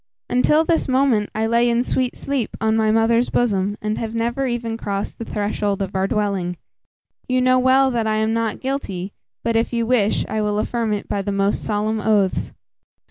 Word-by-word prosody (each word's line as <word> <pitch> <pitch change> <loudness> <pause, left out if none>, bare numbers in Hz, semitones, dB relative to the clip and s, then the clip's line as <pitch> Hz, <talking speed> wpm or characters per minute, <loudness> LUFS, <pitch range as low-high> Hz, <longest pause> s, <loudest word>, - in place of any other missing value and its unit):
Until 300 +5 +4
this 330 0 +1
moment, 255 -5 +2
I 220 +1 0
lay 235 +1 +3
in 235 +1 +2
sweet 255 -1 -1
sleep 275 -5 -3
on 220 0 +1
my 220 -1 +2
mother's 225 +2 +3
bosom, 205 -4 0
and 215 0 -1
have 225 0 -4
never 240 +4 -1
even 235 -2 -2
crossed 200 -3 -4
the 230 - -4
threshold 205 -1 -2
of 195 - -6
our 190 0 +1
dwelling. 195 -4 -1 0.7
You 255 0 +1
know 255 0 +4
well 260 +1 +4
that 230 -2 0
I 215 - +1
am 220 +1 +1
not 225 -2 -1
guilty; 200 -9 -4 0.3
but, 230 0 0
if 225 +1 +1
you 235 -1 0
wish, 225 -4 +1
I 215 - -2
will 210 0 0
affirm 225 +1 -1
it 205 -1 -2
by 200 - -1
the 200 - -3
most 200 +1 0
solemn 215 +1 -1
oaths." 205 -3 +1
225 Hz, 195 wpm, -21 LUFS, 205-245 Hz, 0.7 s, Until